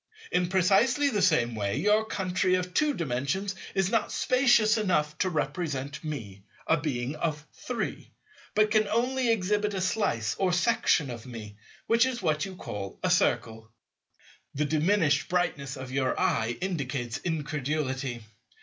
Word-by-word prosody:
In 180 -1 +1
precisely 205 - +3
the 210 -6 0
same 150 -11 +3
way, 100 +1 -2
your 210 +7 +3
country 185 -3 0
of 180 0 -3
Two 300 +4 +2
Dimensions 160 +6 -2 0.2
is 190 0 +1
not 230 - +1
spacious 245 -4 +4
enough 170 -9 +1
to 185 - +2
represent 150 -5 -3
me, 115 -11 -6 0.2
a 160 - +4
being 140 -3 -2
of 150 -3 -2
Three, 240 -3 -4 0.5
but 215 0 +3
can 215 -1 +3
only 245 +2 +1
exhibit 210 0 0
a - - -1
slice 180 - 0
or 185 -2 +2
section 175 - +2
of 120 0 -8
me, 110 -4 -8 0.3
which 230 +2 +4
is 255 -2 -3
what 150 -6 0
you 190 -1 -8
call 100 - -6
a - - +2
Circle. 110 0 +1 0.9
The 150 +2 +1
diminished 155 0 +2
brightness 145 -6 -1
of 130 -1 -7
your 130 -1 0
eye 115 +2 +1
indicates 135 -10 -3
incredulity. 145 -6 -2
165 Hz, 150 wpm, -28 LUFS, 135-205 Hz, 0.9 s, spacious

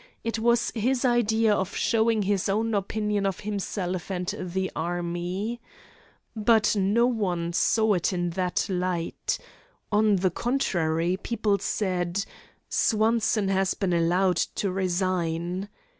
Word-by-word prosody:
It 230 -1 -2
was 235 +1 +2
his 250 +3 0
idea 225 -3 +3
of 190 -2 -2
showing 225 -1 +2
his 195 -1 0
own 220 +3 0
opinion 210 0 0
of 195 - -3
himself 195 -3 -3
and 180 -2 -2
the 185 +1 -3
army. 175 +6 -3 0.7
But 220 0 +3
no 205 +4 +3
one 180 -8 -1
saw 220 +4 +3
it 180 0 +1
in 175 -2 -1
that 180 0 -1
light. 180 -3 -2 0.5
On 210 0 +4
the 185 -1 +1
contrary, 175 -8 0
people 210 -3 0
said: 185 -1 -1 0.4
"Swanson 220 -2 +2
has 195 0 +1
been 190 -3 -1
allowed 175 +2 +2
to 195 +3 -1
resign." 180 0 -1
195 Hz, 125 wpm, -26 LUFS, 180-220 Hz, 0.7 s, On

